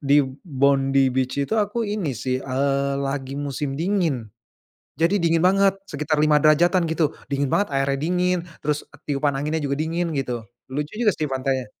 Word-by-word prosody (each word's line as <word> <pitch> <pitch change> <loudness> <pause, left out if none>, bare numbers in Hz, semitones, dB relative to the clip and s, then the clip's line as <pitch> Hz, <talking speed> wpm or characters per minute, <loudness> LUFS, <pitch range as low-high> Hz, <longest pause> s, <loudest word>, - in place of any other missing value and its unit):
di 140 0 +3 0.2
Bondy 135 -3 +2
Beach 130 0 -1
itu - - -7
aku 210 +3 -1
ini 200 - -2
sih, 130 +2 -2
eee, 140 +1 0
lagi 135 0 -3
musim 140 0 -3
dingin, 165 - 0 0.8
jadi 175 +5 +4
dingin 165 -2 +2
banget 195 +2 +4 0.2
sekitar 150 +1 0
5°-an 155 +4 +4
gitu 160 -2 0
dingin 140 -1 -1
banget 200 -4 +1
airnya 135 0 +1
dingin 180 +4 +1 0.2
terus 150 0 -1 0.2
tiupan 140 0 +1
anginnya 150 +4 -1
juga 140 - -1
dingin 165 +1 -1
gitu 125 -5 -3 0.2
lucu 145 +3 -3
juga 215 -3 +4
sih 155 - -2
pantainya. 130 -1 -1
145 Hz, 160 wpm, -23 LUFS, 135-170 Hz, 0.8 s, jadi